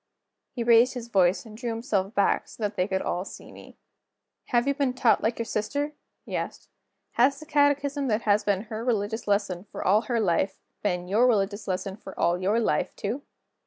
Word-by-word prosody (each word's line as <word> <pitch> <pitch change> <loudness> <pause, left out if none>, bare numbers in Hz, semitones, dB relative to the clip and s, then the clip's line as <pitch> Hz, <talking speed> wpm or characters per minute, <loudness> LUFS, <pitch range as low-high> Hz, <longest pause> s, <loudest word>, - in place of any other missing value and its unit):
He 245 -3 -4
raised 235 +2 +5
his 235 -1 -6
voice, 190 0 +3
and 215 -1 -11
drew 240 +2 -4
himself 225 -3 -1
back 200 - +2
so 225 - -9
that 205 0 -1
they 180 -1 +1
could 190 -2 -1
all 180 - -1
see - - -11
me. - - -14 0.7
"Have 240 +2 +1
you 280 - +3
been 275 -3 0
taught 245 -3 +3
like 225 +2 0
your 230 - -2
sister?" 285 +8 -2 0.3
he - - -5
asked. - - -5 0.4
"Has 260 +4 +3
the 310 - -10
catechism 285 -2 +2
that 220 -1 0
has 210 0 +3
been 200 -1 0
her 220 0 -6
religious 220 -2 -1
lesson, 200 -3 0
for - - -6
all 205 +4 +5
her 235 -2 +2
life, 190 -1 +1 0.2
been 180 -3 -1
your 220 +7 +4
religious 205 -2 0
lesson, 190 +1 -3
for 190 -3 -11
all 175 +1 +2
your 205 +5 +2
life, 230 - 0
too?" 225 +8 -3
215 Hz, 200 wpm, -26 LUFS, 195-245 Hz, 0.7 s, raised